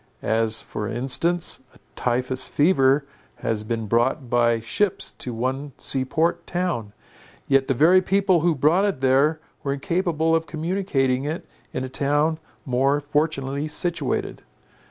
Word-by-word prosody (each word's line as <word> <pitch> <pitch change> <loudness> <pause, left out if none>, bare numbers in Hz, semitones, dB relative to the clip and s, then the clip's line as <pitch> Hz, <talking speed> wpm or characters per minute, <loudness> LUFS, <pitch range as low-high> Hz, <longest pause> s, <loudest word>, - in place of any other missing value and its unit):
As 110 0 0
for 105 - -5
instance, 135 +9 +1 0.2
a - - -20 0.2
typhus 130 +1 0
fever 140 -3 +3 0.3
has 110 -2 -2
been 115 0 -3
brought 120 +4 0
by 120 -1 +3
ships 180 - -1
to 125 - -5
one 130 +4 -3
sea 135 -1 +2
port 170 +4 0
town; 175 - -2 0.6
yet 135 -1 +3
the 135 - +1
very 175 +8 +5
people 190 -1 +2
who 165 0 +2
brought 155 +8 +3
it 200 -9 0
there, 135 +4 +3 0.2
were 140 -2 -1
incapable 165 +1 0
of 165 -1 -1
communicating 155 -6 -1
it 155 +4 -4 0.3
in 130 - -3
a - - -3
town 145 +4 0 0.3
more 135 +2 +2
fortunately 145 -1 -1
situated. 160 -2 -1
140 Hz, 140 wpm, -23 LUFS, 130-165 Hz, 0.6 s, very